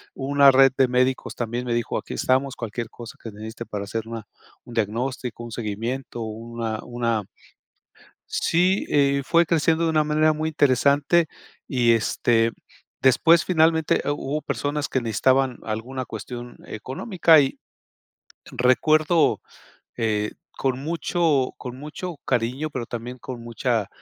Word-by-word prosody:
hubo 135 - -5
una 140 -1 +7
red 135 0 +6
de 130 -1 +5
médicos 125 +1 0
también 120 +1 -3
me 120 - -1
dijo: 120 -1 -1
"Aquí - - -6
estamos, 130 +1 +1
cualquier 115 0 -5
cosa 120 -2 -11
que 115 - -6
necesite 110 +3 -8
para 100 -1 -5
hacer 110 +2 -4
una 115 -2 -6 0.4
un 120 - -11
diagnóstico, 120 +2 -2
un 120 - -9
seguimiento, 115 +3 -4
una 115 0 -5
una" 120 -3 -1 1.1
Sí, 180 +3 +1
eh, 140 -1 +2
fue 170 +3 +3
creciendo 165 0 +2
de 165 - +2
una 155 -1 +3
manera 155 +1 +3
muy 155 +1 -2
interesante 145 +3 +3 0.4
y, 120 -3 +3
este, 115 0 +2 0.5
después 165 +6 +5
finalmente 160 -2 +3
hu - - 0
hubo 145 +1 -3
personas 145 +1 -2
que 130 - 0
necesitaban 130 +3 +1
alguna 120 +4 -4
cuestión 120 -1 -7
económica 160 - +2
y 135 - -1 0.9
recuerdo, 155 +6 +3 0.6
eh, 105 -2 0 0.2
con 130 -1 -1
mucho 160 -2 0
con 125 -1 -7
mucho 150 +4 -7
cariño, 125 +5 -1
pero 130 -5 -4
también 120 +2 -6
con 120 -1 -8
mucha, 115 -3 -1
130 Hz, 140 wpm, -24 LUFS, 115-150 Hz, 1.1 s, una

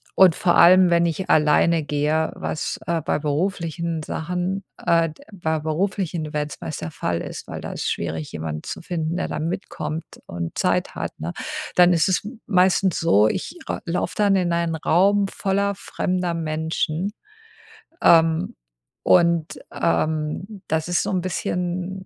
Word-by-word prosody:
und 185 -4 +6
vor 175 -1 +2
allem, 180 0 +7
wenn 170 0 +4
ich 185 +3 -2
alleine 155 +2 +4
gehe, 150 +2 0
was, 155 - -3
äh, 170 -1 0
bei - - 0
beruflichen 165 +1 -2
Sachen, 180 +5 -3
äh, 165 -1 +2
d 155 - -15
bei 160 -4 -1
beruflichen 170 +1 -1
Events 150 -1 -4
meist 155 - -5
der 160 - -5
Fall 85 - -2
ist, - - -7
weil - - -6
da - - -6
ist - - -2
schwierig, 80 -1 -4
jemanden 80 -1 -4
zu - - -6
finden, 170 -1 -3
der - - -1
dann 155 +2 -3
mitkommt 170 -3 -4 0.2
und 85 -1 -5
Zeit - - +1
hat, - - -5
ne? 85 +2 -4 0.4
Dann 180 0 +6
ist 165 +2 +2
es 185 - +1
m 225 +1 -9
meistens 185 -1 +3
so, 110 -10 +4
ich 300 - -3
ra - - -3
laufe 170 +1 -2
dann 200 -2 +4
in 175 -2 +1
einen 170 -1 0
Raum 195 +6 +3
voller 200 0 0
fremder 180 -2 -2
Menschen, 160 +3 -2 0.9
ähm, 165 0 +4 0.5
und, 170 -2 +3
ähm, 160 +5 -1
das 160 +1 -1
ist 175 - +1
so 200 - -2
'n 185 -2 0
bisschen, 180 +1 -3
170 Hz, 160 wpm, -23 LUFS, 155-185 Hz, 0.9 s, allem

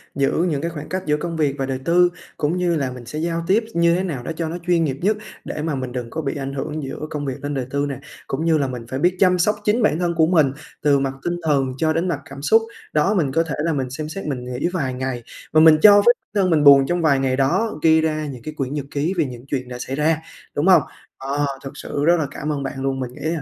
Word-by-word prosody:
giữ 140 -1 +2 0.2
những 145 -2 -1
cái 170 - -2
khoảng 150 -3 -8
cách 185 0 -3
giữa 150 0 +1
công 165 +1 -4
việc 145 -3 +1
và 135 - -1
đời 130 -1 -3
tư 175 +1 +4 0.3
cũng 155 +4 0
như 175 -2 +1
là 135 -4 -1
mình 125 -1 -9
sẽ 150 +6 -5
giao 165 +1 -1
tiếp 205 +5 +3
như 170 0 +3
thế 185 - 0
nào 145 -10 -4
đó - - -4
cho 160 -1 -3
nó 170 - -4
chuyên 175 -2 +3
nghiệp 135 -4 -1
nhất 210 +4 +2 0.3
để 150 - -4
mà 155 -2 -1
mình 130 -2 -4
đừng 120 -2 -5
có 160 - -4
bị 140 -1 -3
ảnh 135 -1 -4
hưởng 145 +3 -4
giữa 135 - -6
công 150 -2 -4
việc 135 0 -5
lên 145 0 -2
đời 135 -3 -2
tư 140 +2 -1
nè. 135 - -5 0.3
Cũng 145 +4 -2
như 165 -1 +4
là 140 -2 0
mình 125 -2 -6
phải 130 +2 -4
biết 180 +3 +2
chăm 180 -2 +4
sóc 210 +5 +3
chính 215 +4 +2
bản 170 -5 +2
thân 175 -1 0
của 160 -1 +4
mình 155 -6 +3 0.3
từ 145 -2 +3
mặt 135 -1 -1
tinh 175 0 -1
thần 135 -4 +1
cho 160 +2 +1
đến 165 +3 0
mặt 165 -5 -1
cảm 140 0 -9
xúc, 225 +10 +4 0.3
đó, 155 +7 +3
mình 160 -9 +1
có 165 +4 +2
thể 160 -3 -4
là 165 -1 +1
mình 130 -3 -2
xem 150 +4 -5
xét 195 +4 -6
mình 135 -4 -3
nghỉ 125 +5 -2
vài 135 -7 -1
ngày. 125 -2 -4 0.3
Mà 155 - +6
mình 160 -1 +8
cho 205 -1 +9
phép - - -6
bản 205 -4 -2
thân 185 - +2
mình 155 -3 +3
buồn 140 -1 +8
trong 175 0 0
vài 145 -4 +3
ngày 130 -1 +1
đó, 145 +8 0
ghi 160 0 +5
ra 155 -1 -1
những 130 -4 -7
cái 155 - -6
quyển 135 -2 -3
nhật 145 -2 -3
ký 150 +6 -1
về 165 - +2
những 125 -1 -8
chuyện 130 -2 -3
đã 125 - -6
xảy 130 +2 -4
ra, 155 +2 +2 0.4
đúng 150 +5 +1
hông? 185 - +7 0.4
Ờ, 140 +2 -1 0.2
thực 135 - -6
sự 145 - -3
rất 170 +2 +5
là 150 - -1
cảm 150 +2 -4
ơn 140 -2 -2
bạn 135 0 -5
luôn. 135 0 -1
Mình 125 -1 -4
nghĩ 145 - -13
là 165 -2 -2
150 Hz, 295 wpm, -21 LUFS, 135-170 Hz, 0.4 s, cho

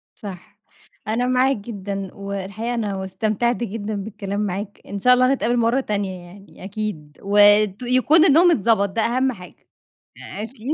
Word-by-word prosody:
صح، 190 -4 -10 0.5
أنا 235 +3 0
معاك 255 +2 +2
جدًا، 200 -3 -6
والحقيقة 200 +4 -5
أنا 200 -5 -3
استمتعت 215 +5 -1
جدًا 215 -2 -4
بالكلام 200 0 -5
معاك، 205 0 -4
إن 200 0 -6
شاء 250 +5 +5
الله 255 +1 +4
نتقابل 245 -2 0
مرة 235 +3 +2
تانية 200 -6 -3
يعني 195 +3 -15
أكيد، 190 -7 -5
وت 205 +1 +4
يكون 255 +7 +4
النوم 340 +3 +6
اتضبط، 210 - +2
ده 220 +4 -1
أهم 255 +3 +1
حاجة 180 -6 -13 0.8
أكيد. 230 +2 -10
210 Hz, 145 wpm, -21 LUFS, 195-240 Hz, 0.8 s, النوم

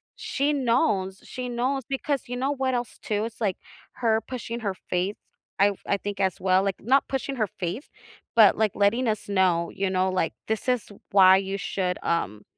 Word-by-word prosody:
she 285 +2 -1
knows, 230 -8 +1
she 250 -1 -6
knows 255 +3 -1
because 275 0 -1
you 245 0 -4
know 270 +3 0
what 265 -1 0
else 240 -1 -4
too, 210 0 -1
it's, 230 0 -9
like, 200 -4 0 0.4
her 225 -2 +3
pushing 235 -2 -5
her 200 -3 -2
faith, 185 +3 -1 0.4
I've 200 0 +3
I 200 - +2
think, 200 0 -5
as 190 -2 0
well, 185 0 +4
like, 195 -1 -1
not 265 +5 +3
pushing 270 0 -3
her 215 - +1
faith, 185 - -5 0.5
but, 220 -3 +7
like, 215 -3 +2
letting 230 +5 +2
us 215 -2 -1
know, 180 -4 +2
you 195 0 -1
know, 185 0 +1
like, 185 -3 0
this 220 +2 -2
is 250 -3 +2 0.3
why 190 -1 +7
you 195 0 -2
should, 185 -2 -2
um 105 - -1
210 Hz, 190 wpm, -26 LUFS, 190-245 Hz, 0.5 s, but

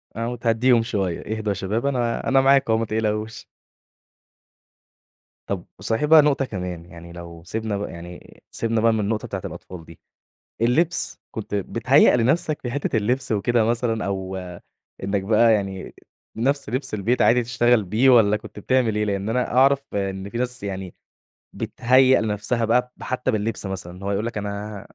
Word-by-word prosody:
آه 115 +1 -2
وتهديهم 120 0 +2
شويَّة، 105 -1 -3
إهدوا 110 -1 -3
يا - - +1
شباب 100 +6 -2
أنا 120 -4 -1
أنا 135 0 +4
معاكم 135 -3 +4
أهو 110 - +2
متقلقوش. 110 0 -2 2.0
طب 95 -3 -3
صحيح 110 +6 0
بقى 155 +1 +8
نقطة 145 -2 +1
كمان، 90 -6 -6
يعني 85 -1 -12
لو 85 -1 -10
سِبنا 110 +2 -3
ب 100 - -5
يعني 85 +1 -11
سِبنا 115 -1 -1
بقى 115 0 +4
من 110 - 0
النقطة 105 +1 -1
بتاعة - - -5
الأطفال 90 -3 -9
دي، 85 -1 -15 0.6
اللِّبس 155 +9 0
كنت 105 -2 -6
بتهيّأ 120 +8 +3
لنفسك 145 +5 +1
في 120 - -3
حِتَّة 140 -2 -2
اللِّبس 120 +4 0
وكده 115 +2 +2
مثلًا، 115 -1 0
أو 95 -1 -3 0.7
إنك 100 0 -1
بقى 110 +3 +4
يعني 95 -2 -4 0.4
نفس 135 +3 0
لِبس 130 +1 -3
البيت 105 +5 +1
عادي 125 +1 +4
تشتغل 120 -1 +2
بيه، 110 +8 +3
والّا 110 -4 +5
كُنت 105 - -11
بتعمل 120 -1 +1
إيه؟ 105 - +1
لأن 100 0 -2
أنا 125 +2 -1
أعرف 135 +1 +5
إن 95 -1 -3
في 115 - -4
ناس 125 -3 -2
يعني 95 -2 -5 0.6
بتهيّأ 130 +2 +3
لنفسها 110 +2 -1
بقى 125 +2 +1
ب - - -11
حَتَّى 130 0 -1
باللِّبس 110 0 -2
مثلًا، 95 -1 -6
هو 100 - -1
يقول 100 +2 -1
لك 115 -2 -4
أنا 105 0 -5
110 Hz, 165 wpm, -23 LUFS, 100-125 Hz, 2.0 s, بقى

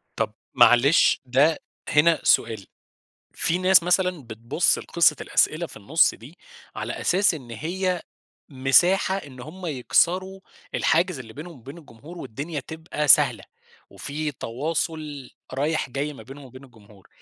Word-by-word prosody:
طب - - -2 0.2
معلش 120 +7 +5
ده 140 +6 +3 0.3
هنا 155 +2 +4
سؤال، 110 -4 +2 0.7
في 170 +2 -1
نَّاس 185 0 +5
مثلًا 180 -2 0
بتبُص 115 +7 0
لقصة 170 -3 +2
الأسئلة 165 +3 0
في - - -15
النُصّ 140 +11 +2
دي، 140 +10 -15 0.4
على - - -4
أساس 190 0 +2
إن 130 -6 -10
هي 180 - -3 0.5
مساحة 155 +8 +3
إن 140 -9 -9
هُم 175 +7 -9
يكسروا 180 +7 0 0.3
الحاجز 175 -1 +1
اللي 115 -4 -10
بينهم 155 +3 -10
وبين 135 +7 -11
الجمهور 150 +3 -13
والدنيا 145 +4 -6
تبقى 160 +1 -5
سهلة، - - +5 0.5
وفي 150 +1 -5
تواصل 150 +2 -4 0.2
رايح 145 +1 -1
جاي 145 +3 -3
ما - - -12
بينهم 140 +1 -12
وبين 130 +1 -13
الجمهور، 105 -6 -20
150 Hz, 130 wpm, -24 LUFS, 130-170 Hz, 0.7 s, معلش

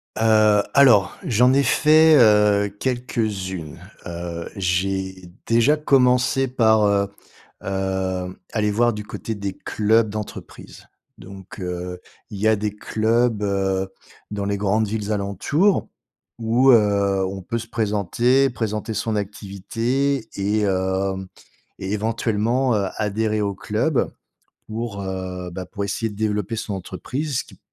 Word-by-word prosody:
Heu, 110 -2 +4
alors, 120 -8 +5
j'en 125 +3 +3
ai 140 - +4
fait, 155 +2 +5
heu, 105 -2 +4
quelques 115 -7 -2
unes. 80 -5 -7 0.3
Heu, 85 -1 -5
j'ai 95 0 -1 0.2
déjà 120 +6 +4
commencé 130 -2 +3
par, 110 -4 +3
heu 100 -1 +2 0.6
heu, 95 -1 -2
aller 105 -2 0
voir 120 +2 +2
du 105 0 -6
côté 110 +2 -6
des 100 -2 -4
clubs 110 +1 +1
d'entreprise. 105 0 -8 0.3
Donc 95 +1 -12
heu, 90 0 -5 0.3
il 100 - -7
y 110 - +2
a 110 - +5
des 105 0 -2
clubs, 110 +1 0
heu, 95 -1 0 0.4
dans 100 -1 -3
les 100 0 -1
grandes 105 +2 +1
villes 105 0 -3
alentours 105 - +1 0.5
où, 115 +4 +3
heu, 100 -3 +3
on 95 +1 -5
peut 115 +6 -3
se 115 0 -6
présenter, 115 +6 +1
présenter 110 -1 -3
son 110 +1 -2
activité 115 +6 -2
et 105 +2 0
hem, 95 0 -1 0.5
et 95 - -4
éventuellement, 115 +3 0
heu, 100 -2 +1
adhérer 110 +1 0
au 100 -1 -1
club 120 +9 0 0.6
pour, 110 -2 -5
heu, 95 -1 -5
bah, 95 +1 -5
pour 100 +2 -5
essayer 110 +3 -2
de 105 - -11
développer 105 0 -1
son 105 -2 -4
entreprise, 130 - -4
ce - - -7
qui - - -17
105 Hz, 135 wpm, -22 LUFS, 95-115 Hz, 0.6 s, alors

